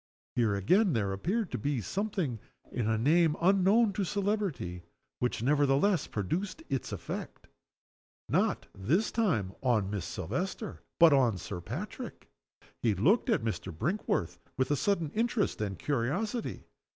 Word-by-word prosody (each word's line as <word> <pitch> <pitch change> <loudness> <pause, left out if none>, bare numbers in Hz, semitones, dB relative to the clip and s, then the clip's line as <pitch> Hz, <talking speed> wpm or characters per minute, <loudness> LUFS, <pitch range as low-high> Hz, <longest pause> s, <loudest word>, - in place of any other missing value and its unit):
Here, 115 -4 +2
again, 180 - +3
there 100 -4 0
appeared 185 - -1
to - - -2
be 140 -3 0
something 185 - -2 0.3
in 115 -3 -1
a 110 - +2
name 155 +6 +4
unknown 195 +4 +4
to 200 - -1
celebrity, 195 - -1 0.4
which 125 -2 -1
nevertheless 145 +6 +3
produced 165 - -3
its 135 -4 -2
effect - - -6 0.8
not, - - +1
this 155 - +1
time, 155 - +1
on 110 -7 +1
Miss 100 -5 -3
Silvester, 185 - -4 0.2
but 165 -3 +7
on 125 -7 +3
Sir 90 +1 -6
Patrick. 185 - -6 0.5
He 110 -4 +2
looked 190 - +3
at 225 - +2
Mr. 110 -1 -3
Brinkworth 90 - -1 0.2
with 130 +1 +1
a - - +4
sudden 170 -2 0
interest 225 - 0
and 100 -3 -2
curiosity. 150 - -2
145 Hz, 140 wpm, -30 LUFS, -, 0.8 s, but